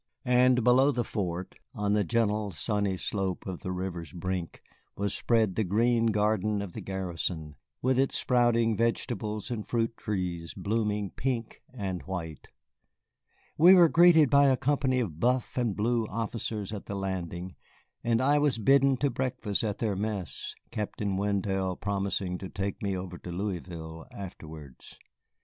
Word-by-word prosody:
And 125 0 +4
below 130 +4 +5
the 120 -3 -1
fort, 90 -5 -3 0.2
on 105 0 0
the 105 -1 +3
gentle 105 +1 +1
sunny 100 +1 -1
slope 95 -1 -2
to 95 - -4
the 90 - -5
river's 90 -4 -4
brink, 90 0 -4 0.3
was 100 0 -1
spread 110 -5 +2
the 110 - 0
green 115 +4 +2
garden 105 -1 +1
of 95 -4 -8
the - - -6
garrison, 85 -5 -4 0.3
with 130 0 +3
its 135 - +2
sprouting 120 -2 +3
vegetables 110 -1 -1
and 110 -3 -2
fruit 115 -1 0
trees 90 -5 -3
blooming 105 -2 -1
pink 120 -3 -3
and 95 -8 -4
white. 85 -5 -6 1.1
We 180 +4 +9
were 175 -3 +7
greeted 165 -4 +6
by 140 0 +6
a 130 -1 +4
company 135 -2 +1
of 85 -9 -4
buff 125 +4 +1
and 120 -6 0
blue 115 +1 +1
officers 110 -1 -4
at 105 - -7
the 100 - -4
landing, 95 -2 -4 0.5
and 115 0 +2
I 145 +3 +4
was 145 -5 +2
bidden 135 +4 +4
to 140 +1 +1
breakfast 120 -5 -2
at 105 -3 -1
their 110 -4 -1
mess, 100 -2 -4 0.2
Captain 105 -3 -2
Wendell 95 -1 0
promising 95 -2 -2
to 95 - -6
take 100 -1 -4
me 100 -2 -1
over 90 -1 -6
to 90 - -8
Louisville 85 -4 -5
afterwards. 80 -8 -10
105 Hz, 155 wpm, -29 LUFS, 95-120 Hz, 1.1 s, We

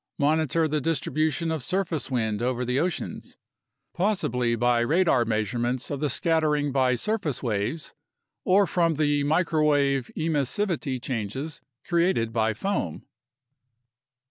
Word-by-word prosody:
Monitor 155 +2 +2
the 150 0 -1
distribution 160 +2 0
of 160 -3 -2
surface 170 -5 -2
wind 110 -4 -1
over 125 0 -1
the 125 +2 0
oceans, 175 +1 -3 0.6
possibly 125 - 0
by 120 +1 +2
radar 135 0 +3
measurements 120 +4 -1
of 140 - -3
the 150 0 0
scattering 150 -1 +1
by 130 -2 +2
surface 170 - -2
waves 115 +6 -2 0.5
or 195 +2 +4
from 170 -3 +1
the 145 -1 +1
microwave 145 -4 +2
emissivity 155 -2 -1
changes 130 +4 -4 0.2
created 170 -10 +1
by 110 -1 +2
foam. 110 - -3
145 Hz, 115 wpm, -26 LUFS, 120-165 Hz, 0.6 s, or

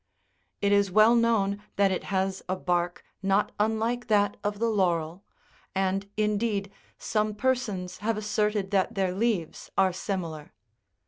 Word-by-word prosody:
It 200 0 +2
is 200 -1 +4
well 215 +4 +6
known 220 -4 +2
that 200 -1 +3
it 185 - -2
has 190 -1 -1
a 185 - +1
bark 175 -1 -1 0.2
not 195 +1 +2
unlike 225 +3 0
that 205 -2 +3
of 205 0 -1
the 230 +2 +1
laurel, 175 -4 0 0.5
and, 195 +1 0
indeed, 210 -1 0 0.3
some 215 -1 -1
persons 210 -7 -1
have 220 +2 -1
asserted 210 -1 0
that 195 -2 +1
their 190 -2 0
leaves 200 -5 -1
are 190 -1 +4
similar. 170 -5 -4
200 Hz, 140 wpm, -27 LUFS, 190-215 Hz, 0.5 s, well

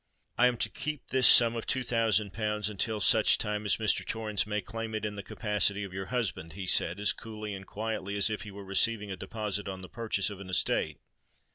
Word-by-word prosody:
"I 125 - +5
am 125 -1 0
to - - 0
keep 150 -2 -6
this 130 -1 +4
sum 120 -1 +7
of 115 - -5
two 130 0 0
thousand 110 -4 +1
pounds 105 -1 -1
until 105 +1 -1
such 100 - +4
time 105 0 -3
as 100 - +3
Mr. 110 -2 +1
Torrens 105 -4 -1
may 105 0 -1
claim 110 +3 -5
it 110 0 -2
in 105 -1 -4
the 100 - -5
capacity 105 -1 0
of 95 -2 -7
your 95 0 -5
husband?" 105 -10 -3
he 95 +2 -6
said, 90 +1 +3
as 105 - +2
coolly 110 -2 -7
and 95 -1 -8
quietly 105 -2 -4
as 100 - +4
if 110 -1 -2
he 105 - -7
were 100 0 -10
receiving 105 +2 +2
a - - -3
deposit 105 0 -4
on 95 -1 -6
the - - -8
purchase 110 -3 -1
of 100 - -9
an 100 -1 -9
estate. 80 -4 0
105 Hz, 230 wpm, -29 LUFS, 100-110 Hz, -, sum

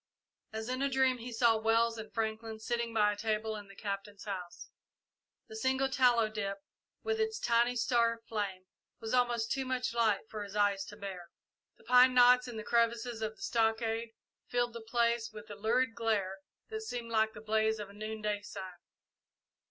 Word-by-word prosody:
As 220 0 -5
in 255 +1 -2
a 275 - +2
dream 260 -1 +2
he 245 +2 -7
saw 230 -1 +4
Wells 225 +1 +2
and 220 - -8
Franklin 220 0 -3
sitting 235 +1 -2
by 210 -2 +3
a - - -7
table 215 +1 -1
in 205 -1 -8
the 195 - -14
Captain's 200 0 -5
house. 185 -4 -6 0.8
The 220 - -10
single 265 +4 +1
tallow 245 -4 +4
dip, 200 -2 -3 0.5
with 445 0 -1
its 440 0 0
tiny 240 - +2
star 235 -1 +3
of 230 0 -23
flame, 200 -5 -3 0.3
was 225 +1 -4
almost 240 -2 +2
too 270 - 0
much 255 -2 -2
light 225 -4 +2
for 215 -2 -5
his 200 0 -9
eyes 200 -2 +2
to 205 - -11
bear. 190 -4 -7 0.5
The - - -22
pine 250 0 +6
knots 250 0 +6
in 240 -2 -6
the 215 - -5
crevices 235 0 +1
of 220 0 -2
the 195 - -11
stockade 225 0 0 0.3
filled 240 -1 0
the 235 - -7
place 235 0 +1
with 215 0 -10
a - - -6
lurid 230 +4 +1
glare 210 -5 -1 0.3
that 440 -1 -4
seemed 240 - -5
like 220 0 +2
the 210 - -9
blaze 220 0 +1
of 205 -2 -7
a - - -15
noonday 210 0 -3
sun. 195 -2 -8
225 Hz, 190 wpm, -32 LUFS, 210-240 Hz, 0.8 s, pine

